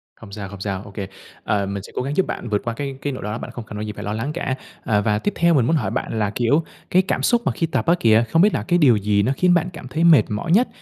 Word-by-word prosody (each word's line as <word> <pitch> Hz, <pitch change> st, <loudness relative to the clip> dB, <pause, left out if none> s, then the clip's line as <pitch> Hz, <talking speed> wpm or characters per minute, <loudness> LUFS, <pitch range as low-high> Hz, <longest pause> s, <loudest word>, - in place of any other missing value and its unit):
Không 110 Hz, -3 st, -13 dB
sao, 100 Hz, -1 st, -6 dB
không 100 Hz, -1 st, -10 dB
sao, 95 Hz, -2 st, -3 dB
ô 100 Hz, -, -12 dB
kê. 100 Hz, -1 st, -5 dB, 0.4 s
À, 100 Hz, -2 st, 0 dB
mình 100 Hz, 0 st, -4 dB
sẽ -, -, -12 dB
cố -, -, -1 dB
gắng 140 Hz, +3 st, -3 dB
giúp 190 Hz, -, +3 dB
bạn 120 Hz, -, -5 dB
vượt 105 Hz, -1 st, 0 dB
qua 115 Hz, -, -2 dB
cái 135 Hz, +2 st, -5 dB
cái 145 Hz, -, -2 dB
nỗi 130 Hz, -, -7 dB
lo 105 Hz, -, -3 dB
đó 110 Hz, -, -3 dB
bạn 120 Hz, -, -7 dB
không 120 Hz, -2 st, -8 dB
cần 105 Hz, -, -8 dB
có -, -, -4 dB
gì 105 Hz, 0 st, -4 dB
phải -, -, -8 dB
lo 105 Hz, -, -3 dB
lắng 120 Hz, +8 st, -3 dB
cả. 155 Hz, -6 st, -2 dB, 0.3 s
Ờ, 105 Hz, -3 st, +2 dB
và 105 Hz, 0 st, +1 dB
tiếp 205 Hz, -, -1 dB
theo 170 Hz, 0 st, +3 dB
mình 130 Hz, -7 st, +3 dB
muốn 160 Hz, -, +2 dB
hỏi 110 Hz, -11 st, -1 dB
bạn 110 Hz, -, -3 dB
là, 105 Hz, -2 st, +1 dB
kiểu, 135 Hz, +7 st, +2 dB, 0.3 s
cái 185 Hz, -, +4 dB
cảm 190 Hz, -, -2 dB
xúc 240 Hz, -1 st, +3 dB
mà -, -, +2 dB
khi 165 Hz, +8 st, -1 dB
tập 160 Hz, -, -1 dB
á 170 Hz, -, +4 dB
kìa, 110 Hz, 0 st, +4 dB
không 165 Hz, -, +4 dB
biết 205 Hz, +2 st, +4 dB
là -, -, -1 dB
cái 175 Hz, -2 st, +3 dB
điều 135 Hz, -7 st, +6 dB
gì 100 Hz, 0 st, +1 dB
nó 125 Hz, -, +1 dB
khiến 180 Hz, -1 st, +4 dB
bạn 175 Hz, 0 st, +1 dB
cảm 150 Hz, -5 st, -9 dB
thấy 155 Hz, +6 st, -1 dB
mệt 165 Hz, -3 st, +7 dB
mỏi 105 Hz, +10 st, -3 dB
nhất 230 Hz, +8 st, +5 dB
120 Hz, 340 wpm, -21 LUFS, 105-165 Hz, 0.4 s, mệt